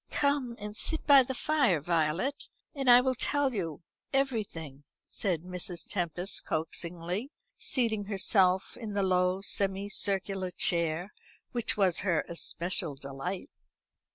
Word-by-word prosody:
"Come 280 -4 0
and 210 0 -7
sit 320 +8 +1
by 280 -2 +8
the 260 +1 -3
fire, 270 - +2
Violet, 170 - -1 0.2
and 270 -3 0
I 245 0 +9
will 260 0 +1
tell 280 +2 0
you 170 -6 -4 0.3
everything," 205 - -2 0.2
said 175 -6 -2
Mrs. 180 -1 -3
Tempest 180 +1 -2
coaxingly, 170 - -3 0.3
seating 220 -5 +1
herself 190 -2 +2
in 220 -4 -6
the 200 -1 +1
low 180 0 +2
semi 195 0 -1
circular 195 -2 0
chair 170 0 -1 0.4
which 240 -3 -1
was 190 -4 +3
her 175 -5 +1
especial 170 -1 -1
delight. 140 +7 -5
190 Hz, 125 wpm, -30 LUFS, 170-235 Hz, 0.4 s, I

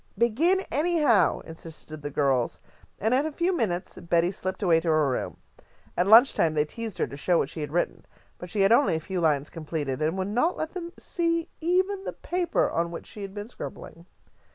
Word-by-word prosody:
"Begin, 310 - +3
anyhow!" 300 - +3
insisted 160 -1 -10
the 145 - -4
girls, 135 -4 0 0.4
and 220 +4 0
in 265 +3 +3
a - - -4
few 350 +5 0
minutes 185 - -2
Betty 170 +1 +2
slipped 190 +1 -4
away 170 -4 +4
to 165 - -6
her 155 -2 +3
room. - - -3 0.6
At 180 - +1
lunch 230 +6 +8
time 160 -2 +1
they 150 0 +2
teased 225 +5 -7
her - - +1
to - - -9
show 160 +5 0
them - - +5
what 135 - -3
she 165 - -6
had 145 -1 -4
written, 175 +2 -2 0.3
but 180 - -8
she 200 - -1
had 195 +2 +4
only 235 - +4
a - - -1
few 180 +2 -4
lines 150 -3 +1
completed, 155 -4 -4
and 160 +4 0
would 190 +1 -2
not 250 - +1
let 315 +1 -3
them 345 -2 -6
see 335 -1 -1
even 375 +4 +1
the - - -4
paper 350 -1 0
on 170 +1 0
which 170 - -7
she 210 - -10
had 195 0 -7
been 205 +1 -5
scribbling. 170 -7 -9
190 Hz, 215 wpm, -26 LUFS, -, 0.6 s, lunch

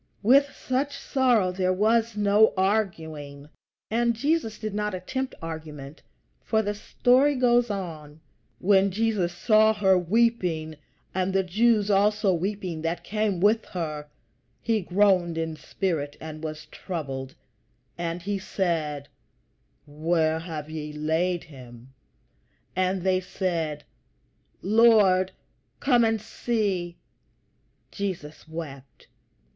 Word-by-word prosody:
With 275 +6 +4
such 275 +2 -2
sorrow 245 -9 +2
there 185 0 0
was 220 +3 +2
no 210 +1 +4
arguing, 160 -8 -2 0.4
and 235 +1 +2
Jesus 280 -3 0
did 215 -2 -5
not 210 -1 -2
attempt 260 +9 -4
argument; 155 -3 -7 0.4
for 220 -1 +1
the 205 0 -1
story 255 +7 +2
goes 245 -2 +3
on: 160 -7 -6 0.4
"When 195 0 +3
Jesus 205 -3 0
saw 215 +4 +4
her 190 -2 +4
weeping, 180 -6 0 0.4
and 185 +1 -1
the 195 0 +2
Jews 210 +2 +2
also 205 0 +3
weeping 180 -2 -3
that 165 +2 -2
came 210 -3 -1
with 215 +4 +3
her, 155 -4 -5 0.5
he 225 -2 0
groaned 180 -2 +2
in 160 -1 -2
spirit 155 -4 -3
and 155 0 -8
was 155 -1 -6
troubled; 135 -7 -5 0.6
and 170 0 -4
he 200 +1 -2
said, 160 -7 -2 0.8
Where 160 +1 0
have 160 -3 -6
ye 155 -1 -6
laid 160 +4 0
him? 130 -4 -14 0.8
And 185 0 0
they 185 -1 +2
said, 165 -5 -3 0.8
Lord, 200 -3 +5 0.5
come 245 -4 +3
and 225 -1 +2
see. 200 -6 -2 0.9
Jesus 170 -7 -5
wept." 140 -5 -9
185 Hz, 115 wpm, -26 LUFS, 160-215 Hz, 0.9 s, Lord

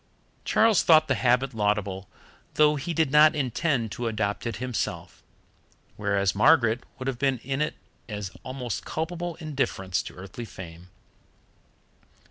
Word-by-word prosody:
Charles 220 -4 +4
thought 155 -1 +5
the 135 - +2
habit 125 +1 +2
laudable, 105 -3 -1 0.5
though 150 0 +5
he 150 +4 -4
did 160 -4 +1
not 150 +1 +6
intend 130 - 0
to 120 +3 -3
adopt 110 0 -2
it 115 - -3
himself, 125 +1 -4 0.7
whereas 100 -2 0
Margaret 115 0 +4
would 130 - -6
have 130 -3 -2
seen 135 -2 +2
in 135 +2 -2
it 150 - -1 0.3
an 105 -1 -5 0.2
almost 130 -3 -5
culpable 170 +1 -4
indifference 140 - -2
to - - -10
earthly 95 +6 -8
fame. 90 -3 -11
125 Hz, 135 wpm, -26 LUFS, 105-150 Hz, 0.7 s, not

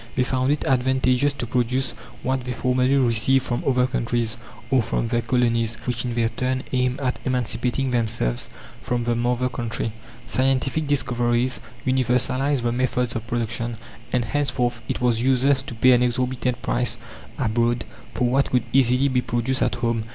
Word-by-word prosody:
They 130 - +3
found 130 +1 0
it 150 - -1
advantageous 130 +1 +2
to 130 - -4
produce 125 +2 0 0.3
what 130 0 -1
they 125 0 -3
formerly 125 +2 +1
received 125 +1 +3
from 120 - -2
other 125 -2 +3
countries, 120 -2 -1 0.4
or 130 -2 +4
from 115 +1 -1
their 120 0 +1
colonies, 115 -2 +1
which 120 -2 -2
in 120 -1 -3
their 115 -1 +2
turn 130 +3 -2
aimed 125 0 0
at 130 -1 -1
emancipating 125 +1 -1
themselves 110 - -1 0.3
from 120 -1 -1
the 120 0 +1
mother 120 +1 +1
country. 120 -2 -3 0.3
Scientific 135 +3 0
discoveries 120 -2 +1 0.3
universalized 130 +1 +1
the 120 - +1
methods 125 -1 0
of 115 0 -4
production, 115 0 -2 0.3
and 125 -2 +1
henceforth 125 -2 -1
it - - -3
was 120 -2 +2
useless 130 +1 +3
to 130 -3 -8
pay 130 +3 +5
an 125 -1 +5
exorbitant 125 0 -1
price 120 -1 0 0.4
abroad 120 -1 0 0.3
for 125 - +1
what 135 +3 +2
could 125 -2 +2
easily 130 +1 +4
be 130 -2 +1
produced 120 +2 -1
at - - +1
home. 115 -2 -1
125 Hz, 165 wpm, -23 LUFS, 120-130 Hz, 0.4 s, pay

